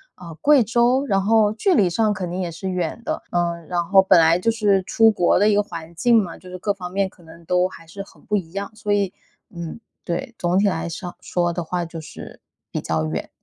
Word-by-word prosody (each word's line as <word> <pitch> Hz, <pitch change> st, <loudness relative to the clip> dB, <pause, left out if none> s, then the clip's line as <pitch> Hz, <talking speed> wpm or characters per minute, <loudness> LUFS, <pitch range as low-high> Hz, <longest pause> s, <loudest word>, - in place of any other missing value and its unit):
啊， 170 Hz, -2 st, -10 dB
贵 285 Hz, -, +4 dB
州。 240 Hz, +5 st, +2 dB
然 195 Hz, -7 st, +1 dB
后 215 Hz, +1 st, +3 dB
距 355 Hz, -, +2 dB
离 190 Hz, -, +4 dB
上 210 Hz, +4 st, +1 dB
肯 185 Hz, -3 st, -4 dB
定 180 Hz, -, -3 dB
也 180 Hz, -2 st, -2 dB
是 170 Hz, +3 st, -5 dB
远 180 Hz, +3 st, -3 dB
的， -, -, -3 dB
嗯， 170 Hz, -2 st, -1 dB
然 175 Hz, -1 st, 0 dB
后 190 Hz, +3 st, +6 dB
本 190 Hz, -1 st, +5 dB
来 165 Hz, +1 st, +4 dB
就 205 Hz, -, +1 dB
是 205 Hz, -4 st, +2 dB
出 225 Hz, +4 st, +4 dB
国 180 Hz, -5 st, +2 dB
的 205 Hz, +2 st, +4 dB
一 210 Hz, -, +3 dB
个 205 Hz, -, +4 dB
环 165 Hz, -5 st, -8 dB
境 230 Hz, +5 st, +4 dB
嘛， 170 Hz, -3 st, -8 dB
就 185 Hz, -, -14 dB
是 180 Hz, -, -7 dB
各 205 Hz, +3 st, -1 dB
方 180 Hz, -3 st, -8 dB
面 195 Hz, 0 st, 0 dB
可 185 Hz, -, -23 dB
能 165 Hz, +1 st, -15 dB
都 180 Hz, +2 st, +2 dB
还 165 Hz, -, -13 dB
是 195 Hz, +5 st, -8 dB
很 -, -, -20 dB
不 210 Hz, -2 st, +1 dB
一 170 Hz, -4 st, -6 dB
样。 200 Hz, +1 st, -4 dB
所 210 Hz, -1 st, -2 dB
以， 200 Hz, -2 st, 0 dB, 0.4 s
嗯， 170 Hz, 0 st, -7 dB, 0.3 s
对， 215 Hz, +9 st, -3 dB
总 175 Hz, +1 st, 0 dB
体 200 Hz, +1 st, +3 dB
来 170 Hz, -3 st, -1 dB
说 175 Hz, +1 st, -7 dB
说 175 Hz, -1 st, -1 dB
的 170 Hz, +1 st, -3 dB
话 175 Hz, +2 st, -2 dB
就 165 Hz, 0 st, -8 dB
是 155 Hz, -1 st, -11 dB, 0.3 s
比 -, -, -2 dB
较 80 Hz, -1 st, -1 dB
远。 80 Hz, +1 st, -4 dB
185 Hz, 265 characters per minute, -22 LUFS, 170-210 Hz, 0.4 s, 后